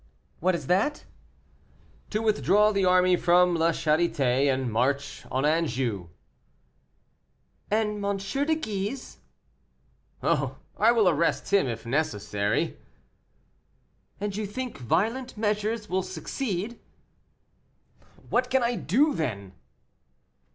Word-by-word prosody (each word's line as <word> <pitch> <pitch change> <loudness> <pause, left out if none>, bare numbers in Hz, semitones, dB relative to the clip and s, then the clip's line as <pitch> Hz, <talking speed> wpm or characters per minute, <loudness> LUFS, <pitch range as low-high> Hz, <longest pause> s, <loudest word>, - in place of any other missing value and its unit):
"What 185 +2 +2
is 155 -5 -5
that?" 200 - +1 1.0
"To 215 +1 -1
withdraw 210 -1 +3
the 195 -2 +1
army 180 0 +5
from 175 0 +4
La 165 0 +3
Charité, 145 -5 +2
and 130 -2 -1
march 135 +5 -1
on 130 +2 0
Anjou." 130 - 0 1.6
"And 210 -1 0
M. 200 0 0
de 275 +11 0
Guise?" 220 -2 -4 1.0
"Oh, - - 0 0.2
I 225 +2 +4
will 225 -5 +3
arrest 170 +3 +1
him 195 -8 +4
if 115 -1 -5
necessary." 105 -7 -1 1.4
"And 205 -1 -3
you 210 0 -3
think 255 - -5
violent 220 - -1
measures 210 +1 -1
will 190 0 0
succeed?" 190 - -4 1.5
"What 250 0 +2
can 260 -1 +2
I 235 0 0
do, 280 - +2
then?" 100 - -3
185 Hz, 110 wpm, -27 LUFS, 145-215 Hz, 1.6 s, army